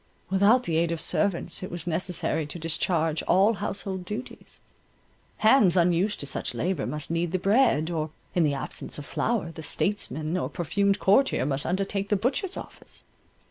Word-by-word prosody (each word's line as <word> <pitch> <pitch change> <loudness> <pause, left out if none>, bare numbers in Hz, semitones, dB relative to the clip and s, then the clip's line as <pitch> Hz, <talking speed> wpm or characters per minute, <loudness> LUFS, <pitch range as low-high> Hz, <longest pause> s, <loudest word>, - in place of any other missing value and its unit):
Without 205 +6 +4
the 165 -6 -1
aid 170 0 +1
of 165 - -2
servants, 180 -2 0
it 185 - -5
was 175 -1 -6
necessary 170 -2 -1
to 150 - -7
discharge 165 -1 0
all 200 +5 +4
household 195 -2 -3
duties; 210 +7 -8 0.8
hands 215 -5 +5
unused 180 +4 +2
to - - -5
such 135 -2 -2
labour 165 +4 -1
must 150 +1 -5
knead 165 0 0
the 185 - +1
bread, 185 - +3
or 155 -2 -2 0.2
in 175 - +2
the 150 -3 +2
absence 135 - -4
of 145 - -7
flour, 220 -3 -1
the 160 - -9
statesmen 160 -3 -1
or - - -2
perfumed 200 +3 0
courtier 210 - +3
must 140 0 -1
undertake 195 +2 -1
the 210 - +3
butcher's 265 - -1
office. - - -8
180 Hz, 170 wpm, -26 LUFS, 160-200 Hz, 0.8 s, hands